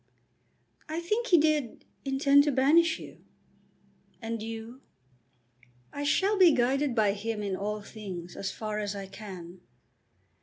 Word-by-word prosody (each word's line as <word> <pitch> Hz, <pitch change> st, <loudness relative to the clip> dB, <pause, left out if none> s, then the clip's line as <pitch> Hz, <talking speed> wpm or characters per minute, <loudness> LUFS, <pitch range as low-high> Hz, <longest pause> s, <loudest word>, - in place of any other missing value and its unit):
"I 315 Hz, +2 st, -2 dB
think 425 Hz, +8 st, -1 dB
he 350 Hz, -, +6 dB
did 300 Hz, -6 st, +1 dB, 0.2 s
intend 275 Hz, +1 st, +4 dB
to 295 Hz, -, +2 dB
banish 320 Hz, +5 st, +4 dB
you." -, -, -12 dB, 1.0 s
"And 230 Hz, -1 st, -4 dB
you?" 225 Hz, +3 st, -7 dB, 1.1 s
"I 285 Hz, -, -4 dB
shall 390 Hz, +7 st, +2 dB
be 350 Hz, -4 st, +7 dB
guided 265 Hz, +2 st, +1 dB
by 210 Hz, -3 st, +3 dB
him 215 Hz, +1 st, -4 dB
in 195 Hz, -2 st, -2 dB
all 210 Hz, +2 st, -3 dB
things, 190 Hz, -5 st, -8 dB
as 195 Hz, -, -3 dB
far 215 Hz, -1 st, -4 dB
as 205 Hz, -1 st, -3 dB
I 200 Hz, -1 st, -5 dB
can." 185 Hz, -3 st, -10 dB
230 Hz, 140 wpm, -29 LUFS, 205-295 Hz, 1.1 s, be